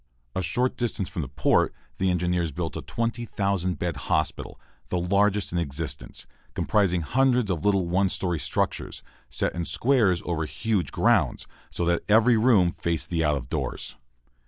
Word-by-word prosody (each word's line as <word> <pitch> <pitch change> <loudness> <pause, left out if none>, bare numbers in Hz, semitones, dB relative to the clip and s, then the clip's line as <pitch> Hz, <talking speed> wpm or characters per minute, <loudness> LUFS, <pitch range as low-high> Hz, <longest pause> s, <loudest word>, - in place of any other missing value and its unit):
A - - 0
short 120 +8 0
distance 115 -5 -2
from 85 - -4
the 70 - -4
port, 65 - +2 0.2
the 95 - +2
engineers 90 -2 0
built 80 +3 -4
a - - -4
20,000 100 -6 -1
bed 85 -3 -2
hospital, - - -2 0.3
the 90 - 0
largest 100 +3 +2
in 85 - 0
existence, 70 -2 -4 0.3
comprising 95 -5 +2
hundreds 125 - +2
of 85 -4 -2
little 100 -3 +2
one 95 +2 +2
story 90 -3 -1
structures, - - -2 0.3
set - - -1
in 85 - -3
squares 110 -4 +2
over 80 -3 -1
huge 105 +2 -1
grounds, - - +2 0.2
so 85 - -2
that 85 0 +1
every 115 +3 +5
room 110 -6 +4
faced 85 0 -3
the 80 -2 +1
out 75 -2 +2
of 65 - -7
doors. - - -4
90 Hz, 160 wpm, -26 LUFS, 85-105 Hz, 0.3 s, every